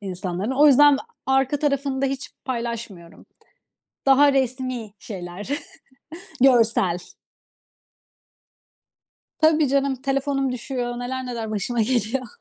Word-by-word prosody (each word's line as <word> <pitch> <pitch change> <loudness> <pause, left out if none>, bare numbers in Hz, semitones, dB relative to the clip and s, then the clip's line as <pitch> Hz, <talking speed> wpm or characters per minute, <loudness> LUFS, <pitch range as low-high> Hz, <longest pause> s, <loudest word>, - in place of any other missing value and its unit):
insanların. 185 +1 -3
O 285 +3 +4
yüzden 290 0 +7 0.3
arka 270 +2 +2
tarafını 280 -2 -1
da - - +3
hiç 270 0 -4
paylaşmıyorum. 230 -8 -6 0.8
Daha 280 +1 +5
resmî 255 -4 -2
şeyler, 185 +2 -8 0.9
görsel. 230 -9 +4 2.4
Tabii 315 -2 +4
canım, 275 0 +1
telefonum 275 0 -1
düşüyor. 245 -1 -4
Neler 255 +1 -4
neler 230 -3 -5
başıma 215 +3 -2
geliyor. 245 +2 -1
255 Hz, 95 wpm, -23 LUFS, 225-275 Hz, 2.4 s, yüzden